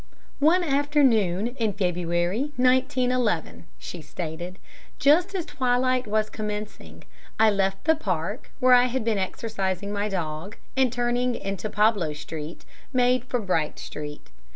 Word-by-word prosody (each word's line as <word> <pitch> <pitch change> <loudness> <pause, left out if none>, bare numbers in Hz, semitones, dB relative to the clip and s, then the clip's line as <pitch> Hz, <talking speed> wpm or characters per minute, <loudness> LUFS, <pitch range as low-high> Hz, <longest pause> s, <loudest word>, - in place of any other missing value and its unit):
"One 335 +5 +4
afternoon, 265 - +2
in 220 -3 +1
February, 180 - -1
1911," 255 - +1
she 175 - -8
stated, 175 +3 -6 0.4
"just 345 +8 +4
as 355 -4 -2
twilight 255 -1 +1
was 215 +1 +1
commencing, 210 -1 -6 0.4
I 220 -1 +6
left 195 -1 0
the 320 +1 +4
Park, 200 - -3
where 255 -1 +5
I 245 0 +7
had 250 -2 -2
been 220 -3 +1
exercising 195 -1 -2
my 205 +1 -1
dog, 175 +1 -4 0.2
and 260 -2 +3
turning 245 0 0
into 195 +2 -4
Pablo 210 -7 +2
Street, 150 +2 -7 0.3
made 250 -1 +2
for 250 -1 -1
Bright 175 -7 -1
Street. 150 0 -8
215 Hz, 130 wpm, -25 LUFS, 185-255 Hz, 0.4 s, I